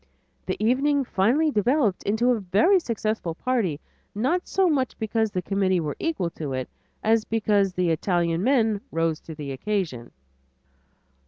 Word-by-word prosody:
The -, -, -2 dB
evening 270 Hz, +5 st, +2 dB
finally 250 Hz, +11 st, +2 dB
developed 230 Hz, -2 st, +1 dB
into 220 Hz, +5 st, +1 dB
a 240 Hz, -, +1 dB
very 205 Hz, -, +3 dB
successful 220 Hz, -, -3 dB
party, 210 Hz, -, -1 dB, 0.4 s
not 305 Hz, -, 0 dB
so 385 Hz, -1 st, +2 dB
much 275 Hz, -6 st, 0 dB
because 220 Hz, 0 st, 0 dB
the 180 Hz, -3 st, -3 dB
committee 190 Hz, -2 st, +1 dB
were 150 Hz, -3 st, -3 dB
equal 300 Hz, -, -1 dB
to 150 Hz, -5 st, -5 dB
it, 130 Hz, -1 st, -3 dB, 0.4 s
as 220 Hz, 0 st, +3 dB
because 210 Hz, -4 st, +1 dB
the 180 Hz, -2 st, +1 dB
Italian 170 Hz, +1 st, 0 dB
men 225 Hz, -5 st, +2 dB
rose 165 Hz, -1 st, 0 dB
to 160 Hz, -, -10 dB
the 145 Hz, -2 st, -6 dB
occasion. 155 Hz, -, -3 dB
210 Hz, 150 wpm, -25 LUFS, 175-245 Hz, 0.4 s, very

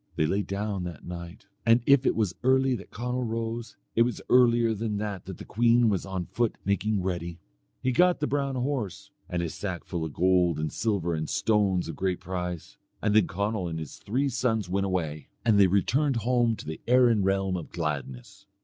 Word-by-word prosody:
They 80 Hz, -, +2 dB
lay 100 Hz, +6 st, +1 dB
down 100 Hz, -1 st, -3 dB
that 85 Hz, -1 st, -8 dB
night, 85 Hz, +1 st, -8 dB, 0.2 s
and 115 Hz, +1 st, +5 dB
if 140 Hz, -1 st, +5 dB
it -, -, +2 dB
was 105 Hz, -5 st, 0 dB
early 130 Hz, +1 st, +3 dB
that 125 Hz, -, -6 dB
Conall 125 Hz, +2 st, -3 dB
rose, 115 Hz, 0 st, -4 dB, 0.2 s
it 115 Hz, -, +4 dB
was 120 Hz, +1 st, +1 dB
earlier 120 Hz, -2 st, +5 dB
than 110 Hz, -1 st, -2 dB
that 100 Hz, -3 st, -4 dB
that 95 Hz, -2 st, -7 dB
the -, -, -9 dB
queen 120 Hz, +1 st, +3 dB
was 100 Hz, -1 st, -1 dB
on 95 Hz, -2 st, -3 dB
foot 120 Hz, +3 st, -1 dB
making 100 Hz, 0 st, 0 dB
ready. 85 Hz, -2 st, -3 dB, 0.5 s
He 130 Hz, -, +2 dB
got 180 Hz, +6 st, +4 dB
the 150 Hz, -, 0 dB
brown 140 Hz, -1 st, -1 dB
horse 125 Hz, -6 st, -3 dB, 0.2 s
and 85 Hz, -1 st, -1 dB
his 85 Hz, -, -3 dB
sack 90 Hz, -4 st, -4 dB
full 85 Hz, -3 st, -4 dB
of 80 Hz, -3 st, -5 dB
gold 90 Hz, -3 st, +3 dB
and 75 Hz, -1 st, -3 dB
silver 100 Hz, -7 st, 0 dB
and 80 Hz, -1 st, -3 dB
stones 100 Hz, -5 st, +1 dB
of 80 Hz, -, -5 dB
great 95 Hz, -2 st, -1 dB
price, 90 Hz, -2 st, -5 dB, 0.2 s
and 105 Hz, 0 st, +1 dB
then 110 Hz, -5 st, +5 dB
Conall 100 Hz, -1 st, -2 dB
and 80 Hz, -, -4 dB
his 80 Hz, -3 st, -7 dB
three 125 Hz, +8 st, -1 dB
sons 115 Hz, -5 st, 0 dB
went 95 Hz, +2 st, 0 dB
away, 80 Hz, -6 st, -2 dB, 0.2 s
and 110 Hz, -3 st, +4 dB
they 100 Hz, -, +7 dB
returned 130 Hz, +9 st, +2 dB
home 120 Hz, 0 st, +2 dB
to -, -, -10 dB
the 80 Hz, 0 st, -6 dB
Erin 120 Hz, -3 st, +5 dB
realm 95 Hz, -1 st, +1 dB
of 85 Hz, -3 st, -5 dB
gladness. 70 Hz, -7 st, -5 dB
100 Hz, 205 wpm, -27 LUFS, 90-120 Hz, 0.5 s, they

